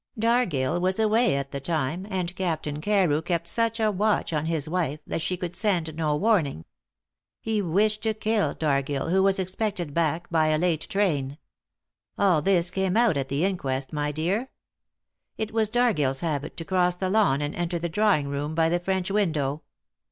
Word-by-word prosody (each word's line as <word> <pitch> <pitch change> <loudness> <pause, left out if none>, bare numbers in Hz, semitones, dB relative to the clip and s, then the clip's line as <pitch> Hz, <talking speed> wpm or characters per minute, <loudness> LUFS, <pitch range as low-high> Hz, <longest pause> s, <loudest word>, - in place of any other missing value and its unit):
Dargill 180 - +1
was 185 +1 0
away 220 - +3
at 140 0 -3
the 140 - -4
time, 160 +5 -2
and 185 -2 -3
Captain 155 -5 -2
Carew 180 -6 +2
kept 170 0 -2
such 230 +4 0
a 215 -1 +2
watch 205 -2 0
on 155 0 -1
his 160 -3 -1
wife 155 -3 -1
that - - -3
she 180 +3 -2
could 175 -1 -5
send 175 -5 0
no 155 -2 0
warning. 160 - +1 0.7
He 220 -2 -1
wished 205 +4 +1
to 220 -1 0
kill 215 -1 0
Dargill, 140 0 -1
who 190 +1 +4
was 195 0 +3
expected 190 -4 -2
back 165 +1 0
by 160 -2 +3
a 155 0 +2
late 165 -1 0
train. 150 -9 0 0.8
All 185 -6 +3
this 175 0 +2
came 190 +1 0
out 235 -7 +4
at 135 -1 -2
the 140 +6 0
inquest, 140 -8 -2
my 150 0 -1
dear. 185 - -1 0.9
It 220 0 -3
was 220 -2 +1
Dargill's 195 - +1
habit 155 -3 -3
to 165 - -5
cross 180 -1 +2
the 185 +1 -2
lawn 190 -9 +3
and 145 0 -2
enter 175 0 -2
the 170 +1 -2
drawing 190 -5 +2
room 145 +2 -3
by 165 0 +3
the 175 +1 +1
French 190 +1 -2
window. 155 -8 0
175 Hz, 180 wpm, -26 LUFS, 150-200 Hz, 0.9 s, who